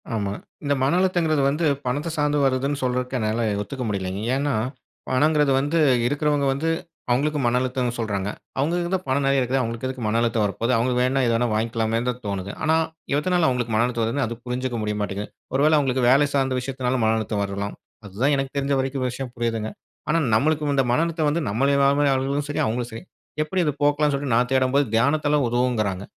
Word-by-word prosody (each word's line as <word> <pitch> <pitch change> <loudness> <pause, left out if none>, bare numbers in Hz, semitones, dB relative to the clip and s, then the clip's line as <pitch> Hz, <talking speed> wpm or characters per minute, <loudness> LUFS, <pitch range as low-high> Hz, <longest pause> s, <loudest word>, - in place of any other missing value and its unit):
ஆமா. 100 -2 -2 0.3
இந்த 145 0 +1
மன 140 +6 +2
அழுத்தங்கிறது 170 -6 +2
வந்து 155 +4 0 0.2
பணத்த 145 +6 -1
சார்ந்து 150 0 +1
வருதுன்னு 135 +2 0
சொல்றதுக்கு 125 0 -1
என்னால 110 +1 -1 0.2
ஒத்துக்க 130 +5 -5
முடியலைங்க. 95 -1 -3
ஏன்னா, 140 0 0 0.6
பணங்கிறது 150 +2 +3
வந்து 145 +4 0 0.3
இருக்கிறவங்க 145 +1 +1
வந்து 155 +4 -1 0.4
அவங்களுக்கு 145 +4 +1
மன 120 +1 +2
அழுத்தம்னு 125 -1 -1
சொல்றாங்க. 100 -3 -2 0.3
அவங்களுக்கு 170 +5 0
தான் 185 -1 0
பணம் 135 +2 +1
நெறைய 135 -1 +3
இருக்குது. 130 +2 0
அவங்களுக்கு 115 +1 -3
எதுக்கு 130 -2 -5
மன 110 +2 +1
அழுத்தம் 115 -2 +1
வர 100 - -1
போகுது? 120 +2 +1
அவங்களுக்கு 125 +1 +1
வேணா 135 +2 +1
எது 115 - +2
வேணா 120 +1 +1
வாங்கிக்கலாமேன்னு 115 +2 0
தான் 125 0 -3
தோணுது. 100 -1 -3
ஆனா, 160 +1 +3 0.4
எதுனால 175 +1 +2
அவங்களுக்கு 120 -3 -1
மன 115 - +3
அழுத்தம் 120 -2 -1
வருதுன்னு 120 +4 0
அது 115 +1 -4
புரிஞ்சுக்க 125 0 -3
முடிய 105 0 -2
மாட்டேங்குது. 100 0 -3 0.3
ஒருவேள 150 +3 +4
அவங்களுக்கு 130 -2 0
வேலை 140 +3 +5
சார்ந்த 135 -2 +1
விஷயத்துனாலும் 130 -1 -2
மன 110 - +3
அழுத்தம் 105 -1 -2
வரலாம். 100 +1 -4 0.3
அதுதான் 120 +9 0
எனக்கு 135 -1 -2
தெரிஞ்ச 140 0 0
வரைக்கும் 130 0 -1
விஷயம் 125 +1 -6
புரியுதுங்க. 115 -2 -2 0.4
ஆனா 160 - +3 0.2
நம்மளுக்கு 150 +4 +2
இந்த 135 - +3
மன 125 - +3
அழுத்தம் 160 -2 -1
வந்து 165 +3 0
நம்மள 140 +7 +2 0.4
ஆளும் 140 +2 -1
சரி 145 - -2
அவங்களும் 120 +2 -2
சரி, 115 - -7 0.4
எப்படி 180 +4 -1
இதை 150 - +1
போக்கலாம்ன்னு 145 0 +2
சொல்லிட்டு, 140 -4 -1
நான் 125 +1 +2
தேடும்போது 130 +2 +3
தியானத்த 145 +5 +2
உதவுங்கிறாங்க. 115 -6 0
130 Hz, 190 wpm, -23 LUFS, 115-145 Hz, 0.6 s, வேலை